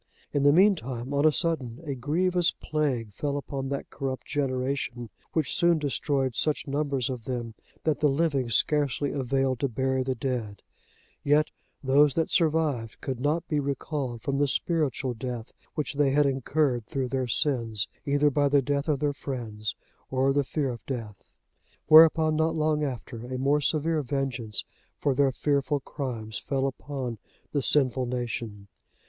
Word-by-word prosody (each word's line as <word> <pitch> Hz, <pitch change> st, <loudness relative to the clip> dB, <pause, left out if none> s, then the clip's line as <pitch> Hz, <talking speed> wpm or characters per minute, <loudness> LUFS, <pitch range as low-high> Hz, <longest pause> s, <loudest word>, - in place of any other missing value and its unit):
In 145 Hz, -, +2 dB
the 145 Hz, +1 st, +6 dB
meantime, 145 Hz, -, +2 dB
on 140 Hz, +2 st, +4 dB
a -, -, +5 dB
sudden, 140 Hz, -8 st, -1 dB
a 145 Hz, -3 st, -3 dB
grievous 170 Hz, +7 st, +2 dB
plague 130 Hz, -9 st, -1 dB
fell 145 Hz, +5 st, -2 dB
upon 135 Hz, -1 st, -4 dB
that 140 Hz, 0 st, -4 dB
corrupt 135 Hz, -1 st, -4 dB
generation, 130 Hz, -3 st, -2 dB, 0.2 s
which 160 Hz, -4 st, 0 dB
soon 170 Hz, -1 st, +4 dB
destroyed 140 Hz, -3 st, 0 dB
such 150 Hz, -1 st, 0 dB
numbers 140 Hz, -3 st, -1 dB
of 125 Hz, -4 st, -5 dB
them, 120 Hz, -3 st, -4 dB, 0.3 s
that 155 Hz, -2 st, +1 dB
the 150 Hz, -, +4 dB
living 140 Hz, -4 st, +1 dB
scarcely 145 Hz, +3 st, +1 dB
availed 135 Hz, -1 st, 0 dB
to 140 Hz, -, +1 dB
bury 130 Hz, +2 st, 0 dB
the 130 Hz, 0 st, -1 dB
dead: 115 Hz, -5 st, -3 dB, 0.6 s
yet, 150 Hz, +2 st, +3 dB, 0.3 s
those 140 Hz, +1 st, +4 dB
that 165 Hz, -, 0 dB
survived, 155 Hz, -, +1 dB
could 130 Hz, -3 st, -4 dB
not 155 Hz, +5 st, 0 dB
be 150 Hz, -, 0 dB
recalled 140 Hz, -3 st, -3 dB
from 140 Hz, -1 st, -1 dB
the 145 Hz, -, +3 dB
spiritual 140 Hz, -4 st, 0 dB
death, 120 Hz, -1 st, -6 dB, 0.2 s
which 150 Hz, -, -2 dB
they 145 Hz, -1 st, +3 dB
had 145 Hz, +2 st, +3 dB
incurred 135 Hz, -2 st, 0 dB
through 130 Hz, -2 st, -2 dB
their 130 Hz, 0 st, -1 dB
sins, 115 Hz, -5 st, 0 dB, 0.2 s
either 145 Hz, +1 st, +2 dB
by 145 Hz, 0 st, +2 dB
the 140 Hz, -1 st, +4 dB
death 140 Hz, +2 st, -1 dB
of 145 Hz, -2 st, +1 dB
their 145 Hz, -1 st, +1 dB
friends, 115 Hz, -7 st, -4 dB, 0.3 s
or 135 Hz, +1 st, +2 dB
the 145 Hz, 0 st, +2 dB
fear 140 Hz, 0 st, -1 dB
of 120 Hz, -, -8 dB
death. 115 Hz, -7 st, -6 dB, 0.6 s
Whereupon, 155 Hz, 0 st, +7 dB
not 160 Hz, +1 st, +1 dB
long 155 Hz, -1 st, +1 dB
after, 125 Hz, -3 st, -5 dB
a 130 Hz, -, -2 dB
more 140 Hz, +3 st, +2 dB
severe 155 Hz, +1 st, +1 dB
vengeance 125 Hz, -6 st, -2 dB, 0.3 s
for 140 Hz, -, +1 dB
their 135 Hz, +1 st, +3 dB
fearful 140 Hz, +2 st, 0 dB
crimes 115 Hz, -6 st, -5 dB
fell 135 Hz, -1 st, -1 dB
upon 135 Hz, -4 st, -4 dB, 0.3 s
the 145 Hz, -, 0 dB
sinful 130 Hz, -3 st, +2 dB
nation. 115 Hz, -4 st, -4 dB
135 Hz, 160 wpm, -27 LUFS, 125-150 Hz, 0.6 s, Whereupon